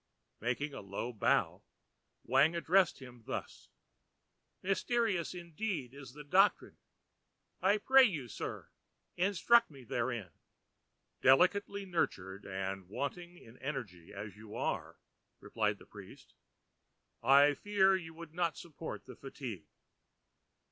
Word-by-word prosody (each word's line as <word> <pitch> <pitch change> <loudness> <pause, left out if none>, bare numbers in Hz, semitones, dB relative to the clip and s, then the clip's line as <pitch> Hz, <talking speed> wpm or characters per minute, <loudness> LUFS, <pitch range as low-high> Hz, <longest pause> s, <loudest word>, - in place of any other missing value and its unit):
Making 125 +6 -2
a - - -6
low 100 +5 -5
bow, 110 - +1 0.6
Wang 140 +7 +4
addressed 175 +1 +3
him 125 -3 -12
thus:—ãMysterious 190 - -4
indeed 170 - -4
is 135 -3 -11
the 150 +1 -10
doctrine: 190 +7 +3 0.8
I 205 - +4
pray 265 +5 +6
you, 155 - -2
Sir, - - -6 0.4
instruct 205 +6 +4
me 140 -4 -13
therein.ã 120 -5 -2 0.9
ãDelicately 195 +8 +4
nurtured 100 - -2
and 95 -1 -4
wanting 175 - -5
in 115 -6 -16
energy 105 - -6
as 100 0 -7
you 105 0 -11
are,ã - - -2 0.4
replied - - -1
the - - -16
priest, - - -13 0.9
ãI 140 +2 +6
fear 195 0 +3
you 165 -3 -6
could 165 -1 -10
not 170 -1 0
support 165 -1 -8
the - - -10
fatigue. 120 - -7
145 Hz, 115 wpm, -33 LUFS, 120-180 Hz, 0.9 s, pray